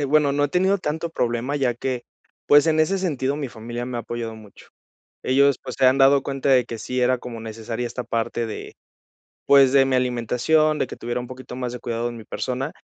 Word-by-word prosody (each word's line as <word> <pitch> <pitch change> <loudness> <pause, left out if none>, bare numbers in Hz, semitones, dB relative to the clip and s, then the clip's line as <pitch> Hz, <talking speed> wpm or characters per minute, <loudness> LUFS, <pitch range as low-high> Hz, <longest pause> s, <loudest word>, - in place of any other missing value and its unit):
eh, 145 - 0
bueno, 145 0 +3
no 145 +1 +1
he 145 - 0
tenido 190 +4 +2
tanto 160 0 -3
problema 125 +1 -1
ya 125 -4 +1
que, 125 0 -3 0.5
pues, 145 +2 +6
en 160 -1 +2
ese 190 +5 +2
sentido 145 -6 -1
mi 140 -4 -4
familia 120 +1 -6
me 125 -1 -5
ha - - -2
apoyado 115 -1 -5
mucho. 105 -3 -15 0.6
Ellos, 140 +1 +3
pues, 130 - -6
se 130 - +5
han 130 +1 +5
dado 135 0 +5
cuenta 135 0 -2
de 125 -3 +5
que 115 - -6
sí 125 +3 -3
era 125 +1 +3
como 120 -2 -8
necesaria 115 +2 -5
esta 125 +1 -5
parte 115 0 -2
de, 110 - -7 0.7
pues, 135 -2 +6
de 135 -1 +6
mi 130 -1 +1
alimentación, 125 +6 +1
de - - 0
que - - -9
tuviera 120 +1 -3
un 125 - -7
poquito 130 -1 -9
más 125 -1 -3
de 125 - -6
cuidado 120 0 -3
de 120 - -3
mi 110 - -10
persona, 130 +3 -3
130 Hz, 230 wpm, -23 LUFS, 120-140 Hz, 0.7 s, pues